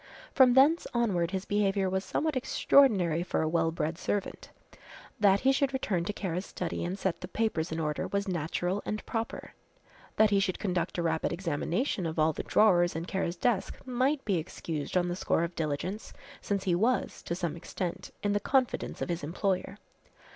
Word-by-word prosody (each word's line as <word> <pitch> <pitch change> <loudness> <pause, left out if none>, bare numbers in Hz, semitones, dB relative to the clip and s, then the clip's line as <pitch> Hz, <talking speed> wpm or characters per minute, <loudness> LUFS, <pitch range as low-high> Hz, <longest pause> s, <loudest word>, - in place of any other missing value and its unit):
From 255 -3 +6
thence 295 +6 +5
onward 190 -8 +1
his 190 0 -3
behaviour 200 -1 +1
was 190 +1 -1
somewhat 310 +6 -1
extraordinary 210 - +3
for 175 - -1
a - - 0
well 165 0 +2
bred 160 +1 -3
servant. 205 -1 -3 0.7
That 200 -2 +4
he 265 - +4
should 270 0 +1
return 190 -10 -1
to - - -1
Kara's 185 -2 -3
study 180 - -4
and 180 +3 -3
set 190 -3 -2
the - - -5
papers 180 -8 -1
in 160 - -2
order 150 -2 -2
was 200 0 -2
natural 175 +3 -1
and 215 - -4
proper. 225 -1 -4 0.6
That 215 -1 +4
he 200 - +4
should 190 -2 0
conduct 180 -4 -2
a 175 - 0
rapid 160 -1 0
examination 175 - -1
of 160 - -5
all 155 0 +3
the - - -4
drawers 175 -6 +3
in 165 +1 -3
Kara's 180 -2 -2
desk 220 -1 0
might 260 +3 0
be 195 -4 +1
excused 155 0 -4
on 175 -1 +2
the 175 - -2
score 170 - +1
of 170 +1 -3
diligence, 165 +7 -3 0.3
since 200 -2 -2
he 185 - +1
was, 230 +8 +1
to 170 - -3
some 170 -3 -2
extent, 170 +1 -5
in 205 0 +1
the 205 - +2
confidence 260 +2 0
of - - -5
his 170 -2 -2
employer. 190 +4 -2
190 Hz, 190 wpm, -29 LUFS, 170-215 Hz, 0.7 s, From